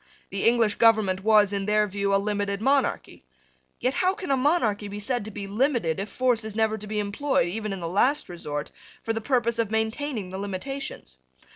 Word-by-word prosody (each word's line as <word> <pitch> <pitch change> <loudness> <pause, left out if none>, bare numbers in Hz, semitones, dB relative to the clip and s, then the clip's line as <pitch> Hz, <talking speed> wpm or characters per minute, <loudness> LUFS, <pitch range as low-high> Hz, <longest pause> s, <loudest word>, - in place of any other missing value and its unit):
The 195 0 -2
English 230 -3 +3
government 215 -5 +4
was, 210 -2 +5
in 200 0 -2
their 210 0 +3
view, 200 0 -2
a 195 - +5
limited 200 0 -1
monarchy. 270 - 0 0.6
Yet 255 - 0
how 370 +5 +1
can 385 -8 -4
a - - +4
monarchy 255 -8 +1
be 205 +1 -6
said 245 +2 -1
to - - -5
be 205 -1 -6
limited 215 - 0
if 200 +1 -4
force 245 -1 +1
is 215 -1 -5
never 220 -1 +2
to 210 - -8
be 210 0 -3
employed, 205 0 0
even 215 +2 -4
in 195 -2 -5
the 170 - -3
last 245 - +1
resort, 150 -5 -5 0.3
for 225 - -1
the 225 - -3
purpose 235 -1 0
of 225 -3 +1
maintaining 220 -1 -2
the 190 - -5
limitations? 200 - -6
215 Hz, 200 wpm, -26 LUFS, 200-245 Hz, 0.6 s, was